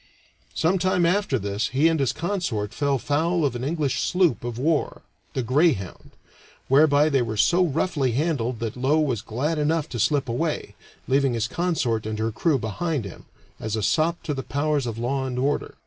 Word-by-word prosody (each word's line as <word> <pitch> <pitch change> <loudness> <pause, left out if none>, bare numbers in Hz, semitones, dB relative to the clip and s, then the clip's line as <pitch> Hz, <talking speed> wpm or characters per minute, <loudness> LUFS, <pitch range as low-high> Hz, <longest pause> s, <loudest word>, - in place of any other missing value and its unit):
Some 180 +4 +2
time 180 -1 +2
after 180 -5 +1
this 100 0 -2
he 140 +5 +2
and 165 -1 +1
his 135 -3 +2
consort 160 - -2
fell 140 0 +1
foul 160 +5 0
of 135 - -1
an 120 - -4
English 150 -1 -1
sloop 175 - +1
of 120 -1 -4
war, 150 +4 0 0.3
the 130 - 0
Greyhound, 130 - +1 0.6
whereby 145 +2 +5
they 140 -4 +2
were 110 -2 -3
so 175 - +4
roughly 150 -5 0
handled 130 -4 -1
that 115 -2 -3
Low 135 +5 +2
was 130 -9 0
glad 150 +8 -2
enough 155 +1 +1
to 120 - -5
slip 140 +4 +1
away, 150 +7 -2 0.3
leaving 135 -1 +2
his 115 0 0
consort 130 -10 -1
and 110 0 -3
her 110 +1 -1
crew 145 +7 +1
behind 130 - -2
him, 100 - -10 0.3
as 110 0 -3
a 110 - -2
sop 165 - +1
to 150 - -2
the 135 - -3
powers 145 -1 -1
of 115 -1 -4
law 130 +3 -1
and 125 -1 -4
order. 140 +3 -1
140 Hz, 190 wpm, -24 LUFS, 120-160 Hz, 0.6 s, whereby